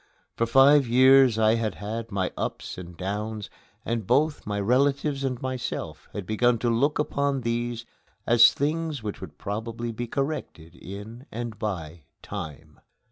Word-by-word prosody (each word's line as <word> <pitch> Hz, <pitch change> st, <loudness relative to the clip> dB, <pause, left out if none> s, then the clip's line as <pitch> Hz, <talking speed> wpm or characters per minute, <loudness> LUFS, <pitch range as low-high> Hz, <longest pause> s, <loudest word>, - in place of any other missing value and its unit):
For 115 Hz, -, 0 dB
five 135 Hz, +2 st, +6 dB
years 130 Hz, 0 st, +6 dB
I 110 Hz, 0 st, +4 dB
had 115 Hz, -2 st, -1 dB
had 115 Hz, +2 st, -5 dB
my 95 Hz, -2 st, -1 dB
ups -, -, -4 dB
and 90 Hz, -2 st, -10 dB
downs, 105 Hz, +2 st, -4 dB, 0.3 s
and 115 Hz, -4 st, -2 dB
both 145 Hz, +2 st, +1 dB
my 105 Hz, -1 st, -1 dB
relatives 135 Hz, +5 st, +1 dB
and 130 Hz, -2 st, -1 dB
myself 130 Hz, -2 st, -4 dB
had 100 Hz, -, -5 dB
begun 120 Hz, +4 st, +2 dB
to 120 Hz, +1 st, 0 dB
look 140 Hz, +6 st, +2 dB
upon 140 Hz, -2 st, 0 dB
these 120 Hz, 0 st, -2 dB, 0.4 s
as 115 Hz, 0 st, +7 dB
things 155 Hz, -2 st, -2 dB
which 105 Hz, -2 st, -5 dB
would -, -, -9 dB
probably 115 Hz, +3 st, -4 dB
be 120 Hz, +2 st, -5 dB
corrected 135 Hz, -, -4 dB
in 105 Hz, +8 st, -9 dB
and 115 Hz, -2 st, -5 dB
by 85 Hz, -7 st, -4 dB, 0.2 s
time. 75 Hz, 0 st, -8 dB
115 Hz, 150 wpm, -26 LUFS, 105-135 Hz, 0.4 s, as